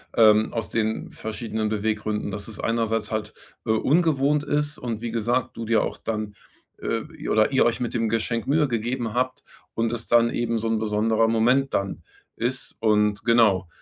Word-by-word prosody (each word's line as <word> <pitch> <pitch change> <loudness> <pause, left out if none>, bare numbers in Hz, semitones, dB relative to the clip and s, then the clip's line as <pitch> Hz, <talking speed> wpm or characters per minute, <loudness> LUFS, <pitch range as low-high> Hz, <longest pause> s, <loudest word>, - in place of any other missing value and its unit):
ähm, 110 -1 +5
aus 115 -2 -3
den 110 -1 -2
verschiedenen 110 0 -4
Beweggründen, 105 0 -2
dass 105 0 -5
es 110 - -7
einerseits 115 -2 0
halt, 110 -1 -3 0.3
äh, - - +1
ungewohnt 145 +3 +2
ist 150 0 -1
und 115 -3 -4
wie 120 -1 -3
gesagt, 120 +2 -1
du 115 - -4
dir 110 -1 +2
auch - - -4
dann, 110 -2 -4 0.5
äh, - - -1 0.2
i - - -6
oder 110 +3 +3
ihr 135 - +4
euch 120 +1 0
mit 120 - -2
dem 115 -2 0
Geschenk 115 +1 -1
Mühe 145 +1 +2
gegeben 120 0 -2
habt 130 +1 -1 0.3
und 115 0 0
es 115 -1 -4
dann 120 0 +4
eben 115 -1 -1
so 115 +1 -2
'n 115 -1 +1
besonderer 110 +1 +2
Moment 125 +5 +2
dann 100 -3 -2 0.4
ist. 125 +2 -3
Und 105 -2 +2
genau, 110 -6 +4
115 Hz, 180 wpm, -24 LUFS, 110-120 Hz, 0.5 s, ähm